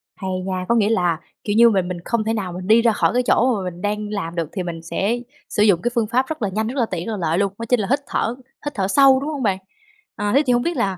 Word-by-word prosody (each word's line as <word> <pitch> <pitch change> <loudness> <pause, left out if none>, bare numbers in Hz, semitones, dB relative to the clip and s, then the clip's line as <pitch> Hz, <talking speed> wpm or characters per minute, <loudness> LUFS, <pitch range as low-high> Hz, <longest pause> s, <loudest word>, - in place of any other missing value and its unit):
Hay 190 -2 -5 0.2
nha! 185 -1 -3
Có 235 - +4
nghĩa 215 -2 +3
là, 175 -7 +1 0.2
kiểu 205 - -1
như, 235 +1 +7
mình 190 -4 +1
mình 180 -1 -4
không 235 -2 0
thể 220 +1 -1
nào 195 -5 -3
mình 180 +1 -7
đi 220 +2 +6
ra 230 0 +4
khỏi 215 - +1
cái 250 +1 +2
chỗ 250 +1 +3
mà 195 - -4
mình 175 0 -12
đang 210 +1 -2
làm 185 -5 -4
được, 165 -3 -2
thì 190 - -3
mình 170 -2 -5
sẽ 200 +8 -1 0.3
sử 210 - +2
dụng 195 -5 +4
cái 240 - -1
phương 230 -2 +1
pháp 255 +4 +1
rất 315 -2 -5
là 205 - 0
nhanh, 215 +3 -2
rất 255 +5 -5
là 235 - +3
tiện, 175 -2 -3
rất - - -2
là 215 - -3
lợi 165 -2 0
luôn, 200 0 0
đó 230 - -4
chính 250 - +3
là 200 - -1
hít 275 - +3
thở, 230 - -1 0.3
hít 290 - -3
thở 190 -2 0
sâu, 270 +5 +5
đúng 285 +3 -4
hông 290 -4 -3
bạn? 195 -4 +1 0.6
À, 205 0 -1
thế 280 - +6
thì 250 - +4
hông 240 - +2
biết 340 -2 -2
là 195 -5 0
210 Hz, 315 wpm, -21 LUFS, 185-235 Hz, 0.6 s, như